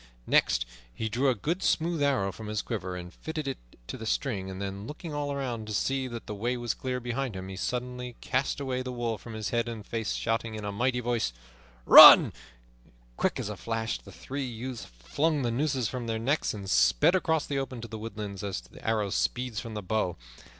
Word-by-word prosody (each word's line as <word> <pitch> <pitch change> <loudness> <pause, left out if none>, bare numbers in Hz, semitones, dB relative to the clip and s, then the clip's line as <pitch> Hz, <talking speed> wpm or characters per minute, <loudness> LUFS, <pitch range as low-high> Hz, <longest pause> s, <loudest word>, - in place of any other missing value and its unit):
Next - - +3 0.3
he 110 - -3
drew 130 +5 +2
a 130 - +2
good 165 - -2
smooth 165 -3 +1
arrow 135 -9 +2
from 110 +3 -9
his 105 -1 -2
quiver 95 -5 -4
and 90 0 -8
fitted 160 -2 -5
it 135 - -3 0.3
to 130 - -6
the 110 -2 -6
string; 95 -8 -2
then, 100 +1 -5
looking 160 +1 -7
all 145 -1 -2
around 125 -6 -3
to 105 - -3
see 135 +3 0
that 120 -2 -7
the - - -5
way 120 +5 -1
was 120 -2 -1
clear 130 -1 -3
behind 120 -1 -3
him, 95 0 -6
he 95 - -6
suddenly 125 +3 -4
cast 130 +2 -1
away 130 -2 -2
the 130 0 -4
wool 120 -3 -2
from 115 - -10
his 110 -1 -3
head 120 0 0
and 110 -3 -7
face, 115 -2 -2
shouting 115 0 -1
in 105 -1 -6
a 100 - -2
mighty 125 +4 0
voice, 115 - 0 0.5
"Run!" - - +11 0.8
Quick - - 0
as - - -3
a - - -4
flash 115 0 -3
the - - -14
three 140 +1 -5
youths 120 -2 -6
flung 140 - -1
the 120 - 0
nooses 135 -1 0
from 125 -1 -5
their 115 -1 -1
necks 135 +7 0
and 100 -2 -7
sped 60 - +4
across 160 -4 +1
the 140 -1 -1
open 130 -2 -4
to 115 - -6
the 110 -1 -7
woodlands 105 -3 -6
as 100 -7 -2
the - - -16
arrow 110 -3 0
speeds 125 -1 -1
from 115 -2 -7
the 105 - -4
bow. 95 -2 -1
115 Hz, 215 wpm, -28 LUFS, 105-130 Hz, 0.8 s, Run